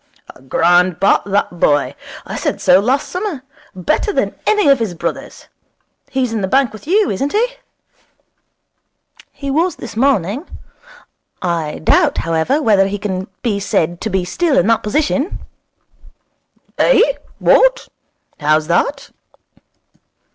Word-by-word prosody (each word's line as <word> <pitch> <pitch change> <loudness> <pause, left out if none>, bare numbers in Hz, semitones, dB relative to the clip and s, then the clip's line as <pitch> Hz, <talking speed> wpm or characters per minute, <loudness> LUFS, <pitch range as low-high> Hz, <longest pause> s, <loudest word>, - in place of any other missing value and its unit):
'A - - -20
grand 175 +6 +2
bat, 195 - +3
that 195 -3 -1
boy. 145 -3 +2 0.3
I - - -6
said - - -2
so 180 - +5
last 255 +7 0
summer. 360 -8 -4 0.3
Better 185 - 0
than - - -1
any 420 -6 +3
of 275 -2 +5
his 215 -6 -3
brothers. 170 - -6 0.6
He's 255 -3 -1
in 220 - -2
the 190 - -1
bank 265 +4 +2
with 215 - -12
you, 400 +3 +2
isn't 275 +9 -2
he?' 455 +4 +2 1.8
'He 280 -1 -5
was 335 +6 +1
this 240 - -9
morning. 250 - 0 1.0
I 165 -4 -2
doubt, - - +3
however, 165 - 0
whether 200 -5 +4
he 200 +1 -3
can 190 -2 -4 0.2
be 215 -5 0
said 175 -4 -1
to 220 - -2
be 190 -2 -1
still 315 - 0
in 175 - +3
that 225 0 +2
position.' 295 - -1 1.4
'Eh? - - +5 0.3
what? - - +3 0.5
How's 155 +1 +2
that?' 275 - -1
215 Hz, 135 wpm, -17 LUFS, 180-280 Hz, 1.8 s, so